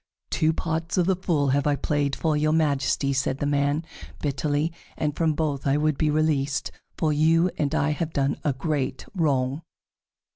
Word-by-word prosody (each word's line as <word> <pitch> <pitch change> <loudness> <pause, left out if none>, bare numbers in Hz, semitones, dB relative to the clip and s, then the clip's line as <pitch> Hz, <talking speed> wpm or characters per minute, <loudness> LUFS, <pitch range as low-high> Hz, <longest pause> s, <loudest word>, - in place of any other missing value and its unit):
"Two 155 0 +2
parts 160 +2 -2
of 180 - +3
the 190 +1 +2
Fool 160 -6 0
have 140 +2 +2
I 145 - +3
played 145 -1 0
for 160 -2 0
your 155 +1 +2
Majesty," 140 -3 +1
said 135 0 0
the 145 - -2
man 145 +2 +1 0.3
bitterly, 145 +2 -1 0.2
"and 150 -1 -1
from 160 -2 +1
both 145 -3 -2
I 135 +1 +3
would 155 0 +1
be 155 +2 +1
released, 150 -2 0 0.3
for 155 -2 +1
you 165 +4 +3
and 150 0 0
I 145 0 +2
have 160 +1 -2
done 140 -1 0
a 150 - +2
great 135 -1 -2
wrong." 140 -5 0
150 Hz, 180 wpm, -25 LUFS, 140-160 Hz, 0.3 s, of